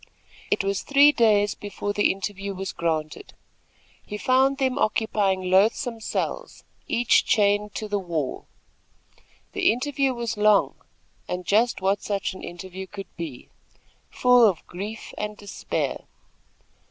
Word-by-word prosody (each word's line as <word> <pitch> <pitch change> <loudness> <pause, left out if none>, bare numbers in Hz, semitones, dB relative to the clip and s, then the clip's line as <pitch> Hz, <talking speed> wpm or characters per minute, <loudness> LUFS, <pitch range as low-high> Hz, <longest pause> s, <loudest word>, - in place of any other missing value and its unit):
It - - +1
was 195 0 -1
three 285 +1 +6
days 210 -6 +3
before 205 0 -5
the 205 - +3
interview 195 0 -5
was 190 0 -4
granted. 155 -2 -3 0.7
He 210 - -6
found 265 +4 +3
them 265 -1 0
occupying 205 -3 +1
loathsome 225 +5 +2
cells, - - -4 0.2
each 240 0 +3
chained 205 0 +2
to 215 - -4
the 205 -1 -1
wall. 165 -7 -4 1.0
The - - +3
interview 270 +2 -1
was 235 -2 -3
long, 210 -1 +4 0.5
and 180 0 -4
just 220 +3 +2
what 195 +2 +1
such 200 -2 -2
an 185 - -10
interview 185 +2 -8
could 195 0 -10
be, 160 -7 -7 0.6
full 250 -1 +4
of 185 -6 -2
grief 205 +5 -7
and 210 0 -4
despair. 205 -1 -4
205 Hz, 130 wpm, -24 LUFS, 190-230 Hz, 1.0 s, three